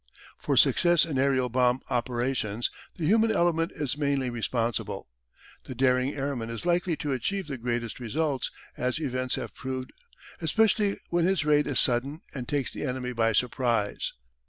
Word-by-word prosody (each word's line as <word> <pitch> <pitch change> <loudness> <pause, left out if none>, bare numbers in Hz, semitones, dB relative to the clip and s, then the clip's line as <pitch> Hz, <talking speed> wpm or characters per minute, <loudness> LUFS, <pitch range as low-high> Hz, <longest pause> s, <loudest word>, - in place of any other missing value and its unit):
For - - 0
success 175 -1 +5
in 145 -5 -2
aerial 130 -2 +2
bomb 125 +1 +2
operations 120 -2 -1 0.2
the 165 - -3
human 220 +6 +4
element 170 -4 +2
is 145 -4 -2
mainly 140 -3 0
responsible. 115 -1 -2 0.6
The 130 - -7
daring 130 +1 +2
airman 135 -5 -3
is 115 +7 -5
likely 175 -1 +1
to 150 -1 -3
achieve 195 +10 -1
the 140 -4 -6
greatest 120 -1 -3
results, 135 +4 -1 0.3
as 125 +4 0
events 130 -4 -1
have - - -5
proved, 130 0 -5 0.5
especially 205 +4 +2
when 170 -1 +2
his 185 -4 +1
raid 150 -1 +3
is 145 - +2
sudden 135 +6 +2
and 125 -3 -5
takes 140 -3 -1
the - - -7
enemy 125 -2 -3
by 115 -1 +2
surprise. 120 -2 0
130 Hz, 155 wpm, -27 LUFS, 125-155 Hz, 0.6 s, success